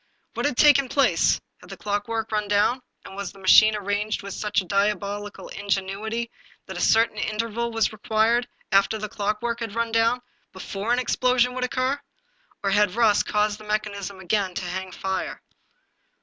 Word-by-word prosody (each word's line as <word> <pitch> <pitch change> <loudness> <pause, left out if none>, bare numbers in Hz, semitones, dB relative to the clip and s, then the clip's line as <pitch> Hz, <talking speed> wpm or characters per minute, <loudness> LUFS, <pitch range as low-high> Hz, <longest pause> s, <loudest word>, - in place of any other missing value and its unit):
What - - 0
had 255 - -3
taken 280 -3 +5
place? 275 0 +3 0.2
Had - - -16
the - - -8
clockwork 215 +2 -2
run 210 -1 -1
down, 205 +5 +2 0.2
and - - -10
was 200 -2 -5
the - - -18
machine 215 +3 +6
arranged 205 +1 -2
with 200 - -6
such 210 -1 0
a 190 - -4
diabolical 205 +1 -2
in 200 - -8
genuity 210 +5 -2 0.3
that - - -8
a - - -4
certain 225 -1 +3
interval 230 +2 -2
was 225 -1 +1
required, 220 +3 +1 0.2
after 195 +2 +3
the 215 0 -4
clock 210 +1 -2
work 235 0 -1
had 225 -3 -5
run 230 0 -1
down, 230 +2 +2 0.3
before 195 +4 -4
an 245 - +3
explosion 250 0 +2
could 255 0 -1
occur? 260 +3 -1 0.6
Or 195 - +1
had 205 -1 +3
rust 220 -3 +3
caused 210 0 0
the - - -11
mechanism 205 -2 -3
to 190 - -11
again 190 -1 0
hang 185 +1 -4
fire 190 0 -3
210 Hz, 180 wpm, -24 LUFS, 200-230 Hz, 0.6 s, machine